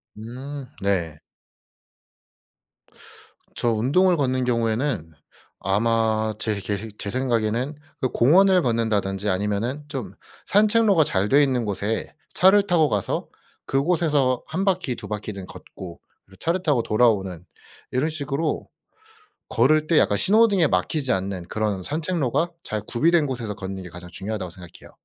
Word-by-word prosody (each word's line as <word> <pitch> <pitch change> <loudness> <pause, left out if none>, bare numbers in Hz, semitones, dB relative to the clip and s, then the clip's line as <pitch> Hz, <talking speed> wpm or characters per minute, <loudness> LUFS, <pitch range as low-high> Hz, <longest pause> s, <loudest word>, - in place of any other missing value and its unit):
음. 130 +5 -7 0.2
네. 85 -6 0 2.4
저 120 - +1
운동을 160 +11 +3
걷는 130 -2 0
경우에는 115 - -1 0.5
아마 110 +2 +1
제 110 -2 -1
계식 105 +2 -5
제 100 - -3
생각에는 120 +2 -1 0.3
그 130 - +1
공원을 180 +8 +5
걷는다든지 105 -5 0
아니면은 105 +9 -1
좀 125 - -6 0.3
산책로가 210 -4 +4
잘 100 -8 0
돼 145 +2 +5
있는 125 -4 0
곳에 105 +2 -2 0.2
차를 195 +2 +5
타고 160 -4 +4
가서 105 -2 -1 0.4
그곳에서 145 -3 +1
1 170 +5 -2
바퀴 185 -10 0
2 - - -9
바퀴든 105 -2 -5
걷고 85 -3 -11 0.3
그리고 95 - -19
차를 175 +3 -1
타고 135 -7 +2
돌아오는 95 -6 +1 0.5
이런 130 +5 0
식으로 150 0 -2 0.8
걸을 155 +6 +3
때 165 - +4
약간 105 - +3
신호등에 200 -6 +4
막히지 140 -6 0
않는 95 -2 -3
그런 105 -3 -2
산책로가 155 - -1
잘 110 -1 -4
구비된 160 +4 +2
곳에서 120 -6 -4
걷는 95 -1 -6
게 90 - -9
가장 90 +1 -11
중요하다고 95 -1 -4
생각해요. 90 -1 -12
120 Hz, 285 characters per minute, -23 LUFS, 100-150 Hz, 2.4 s, 공원을